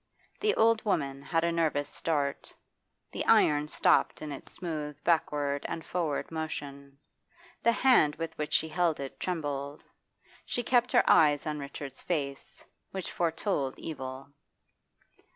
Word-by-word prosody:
The 425 0 +2
old 225 0 +4
woman 140 -9 -1
had 165 +4 0
a 170 - +2
nervous 155 -4 +1
start; 145 -3 -2 0.6
the - - -3
iron 150 0 +5
stopped - - +3
in 150 - -5
its 140 - -8
smooth 155 -5 -4
backward 145 -4 +1
and 165 - -5
forward 165 -5 -2
motion; 140 -3 -6 0.6
the 235 - +4
hand 235 - +4
with 165 +1 -5
which 150 0 -4
she 160 - +2
held 170 -1 +1
it 135 -1 -6
trembled. 145 -5 -3 0.6
She 245 - -2
kept 245 0 +3
her - - +5
eyes 145 -2 +5
on 150 -1 -2
Richard's 140 -1 -7
face, 140 -5 -3 0.2
which 190 -2 -5
foretold 165 -5 -1
evil. 135 -3 -6
150 Hz, 135 wpm, -30 LUFS, 140-170 Hz, 0.6 s, iron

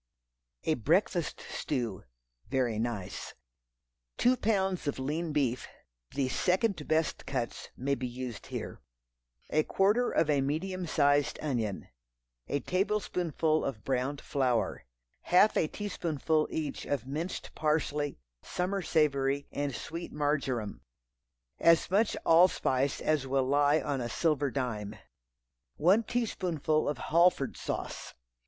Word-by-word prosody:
A 160 - +2
Breakfast 165 - +1
Stew 120 -9 -3 0.4
(very 125 -4 0
nice). 110 -5 -4 0.8
Two 250 +1 +4
pounds 190 -8 0
of 145 - -1
lean 155 +5 -2
beef. 135 -5 0 0.5
(The 135 -2 +1
"second 180 - +1
best 160 0 0
cuts" 125 -4 -3
may 140 +2 0
be 130 -2 -2
used 125 -2 -6
here.) - - -6 0.7
A 155 - +4
quarter 205 +9 +2
of 160 - +2
a 145 -2 +3
medium 175 +6 -2
sized 145 -1 +3
onion. 115 -9 -2 0.6
A 145 - -1
tablespoonful 180 -5 0
of 110 -6 -4
browned 135 +2 -1
flour. 130 -4 0 0.4
Half 185 +4 +5
a 155 - +2
teaspoonful 160 -6 -1
each 155 -3 -4
of 140 -4 -1
minced 155 +7 -4
parsley, 150 -1 0 0.2
summer 190 +2 -2
savory, 140 -4 +1
and 140 -3 -2
sweet 170 +1 -6
marjoram. 140 -7 -1 0.8
As 170 +1 +4
much 210 +3 +2
allspice 155 -5 +3
as 150 -3 +1
will 135 0 +1
lie 145 +3 +4
on 140 -2 -2
a 120 - -3
silver 145 +1 +1
dime. 110 -6 -3 0.8
One 190 +8 +4
teaspoonful 180 - 0
of 145 - -2
Halford 170 -2 +3
sauce. - - -5
150 Hz, 120 wpm, -30 LUFS, 135-170 Hz, 0.8 s, Half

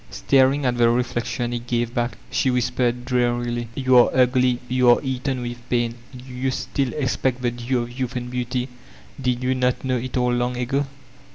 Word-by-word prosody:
Staring 135 +1 +2
at 125 -1 +1
the 120 -1 +5
reflection 120 0 -1
it 120 0 -5
gave 120 -1 -1
back, 120 -1 -1
she 130 +1 +1
whbpexed 125 0 0
drearily: 120 -1 0
"You 130 -2 +3
are 120 - +5
ugly, 125 -1 +3
you 125 0 +3
are 120 - +7
eaten 130 -1 -2
with 120 0 -5
pain 120 -1 +1 0.2
I 130 - -11
Do 125 +1 -11
you 130 +1 -1
still 130 0 -2
expect 130 -2 -1
the 120 - +1
due 120 +1 -1
of 120 +2 -9
youth 130 0 -2
and 125 -1 -3
beauty? 125 +1 -2 0.5
Did 125 -1 0
yon 130 0 0
not 125 +1 0
know 130 -1 +1
it 130 +2 -4
all 125 0 +2
long 120 0 -1
ago?" 135 +3 -1
125 Hz, 195 wpm, -23 LUFS, 120-130 Hz, 0.5 s, are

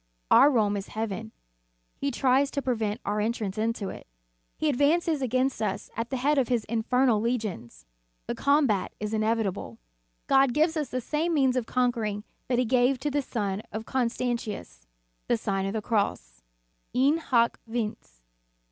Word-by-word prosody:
Our 285 - +8
Rome 210 -6 +2
is 195 - -5
heaven; 210 - -4 0.6
he 280 - -2
tries 270 +1 +2
to 280 - -2
prevent 225 -3 -1
our 205 +1 0
entrance 215 -3 -2
into 220 -2 -1
it. - - -9 0.5
He 310 - 0
advances 300 +2 +2
against 255 +1 0
us 210 -2 -2
at 230 +2 -3
the 265 - -2
head 285 +3 +2
of 255 - +1
his 240 -3 0
infernal 230 0 +2
legions. 215 - -3 0.4
The - - -2
combat 280 -9 +2
is 210 +1 -3
inevitable. 215 - -1 0.5
God 270 -2 +4
gives 320 +2 +3
us 300 -5 -2
the 255 - -2
same 320 +6 -1
means 265 -3 +3
of 245 -3 -1
conquering 230 -5 0 0.2
that 250 - +1
He 250 - +2
gave 250 +2 +3
to 295 - -1
the 290 +1 +1
son 205 -6 -2
of 220 +1 -5
Constantius; 235 - -3 0.4
the 240 - +2
Sign 195 -3 -1
of 195 - -3
the 220 -1 -2
Cross; 130 - -1 0.5
In 275 +5 +4
hoc 235 -7 +2
vince. 210 - -5
235 Hz, 165 wpm, -27 LUFS, 210-265 Hz, 0.6 s, Our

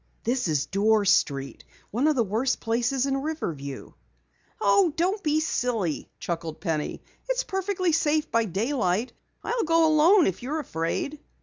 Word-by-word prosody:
"This 245 -1 0
is 150 -4 0
Dorr 210 +2 +2
Street 140 -7 +1 0.3
one 250 +8 +1
of 310 - +3
the 240 - +3
worst 225 +6 0
places 245 +3 0
in 275 -1 0
Riverview." 160 - -5 0.7
"Oh, 380 -5 +4
don't 375 +5 0
be 305 -3 +1
silly," 235 - -1
chuckled 165 -2 -4
Penny. 160 -5 -3 0.3
"It's - - +1
perfectly 380 -2 -1
safe 310 -1 +1
by 230 0 +2
daylight. 215 - -1 0.3
I'll 480 -1 -1
go 330 0 +4
alone 320 +5 +5
if 190 - -1
you're 275 +6 -3
afraid." 265 - -3
250 Hz, 145 wpm, -26 LUFS, 190-315 Hz, 0.7 s, alone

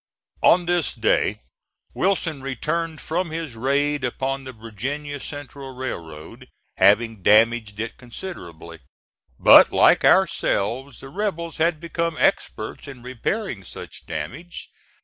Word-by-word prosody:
On 175 0 +5
this 175 -3 +1
day - - +1 0.5
Wilson 175 -6 0
returned 155 +4 -3
from 175 +2 -2
his 160 -5 -5
raid 140 +4 0
upon 135 +2 -2
the 130 - -6
Virginia 130 +6 -5
Central 140 -2 -8
Railroad, 80 -12 -7 0.3
having 105 +2 +3
damaged 110 +1 +3
it 115 +1 -4
considerably. 85 - -9 0.6
But, - - +8
like - - +5
ourselves, 120 +7 +2
the 135 - -10
rebels 170 -2 -3
had 160 0 +1
become 170 -1 -2
experts - - -1
in 130 -4 -10
repairing 130 - -3
such - - -10
damage. 160 - -6
135 Hz, 115 wpm, -23 LUFS, 115-165 Hz, 0.6 s, But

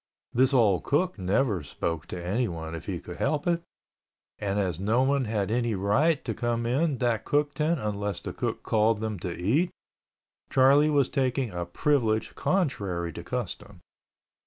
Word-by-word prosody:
This 130 +2 +4
old 110 -8 +3
cook 170 - 0
never 100 +1 +1
spoke 80 +2 -4
to 90 - -6
anyone 90 -6 -2
if 85 - -7
he - - -2
could - - -9
help 150 -2 0
it, 170 -1 +1 0.8
and 100 0 -1
as 90 -5 0
nobody 130 +7 +2
had 105 -2 -1
any 120 -2 +1
right 135 - +2
to - - -1
come 120 -1 -1
in 140 +4 +1
that 120 -3 0
cook 145 0 +1
tent 155 +1 0
unless 105 -4 -2
the - - -6
cook - - -3
called 110 0 +2
them 110 -3 -3
to 90 +1 -4
eat, 135 - +2 0.8
Charlie 140 +3 +5
was 140 -3 +3
taking 130 -3 0
a 85 -1 -4
privilege 110 +1 +1
contrary 100 - -1
to - - -7
custom. - - -5
115 Hz, 160 wpm, -27 LUFS, 100-140 Hz, 0.8 s, Charlie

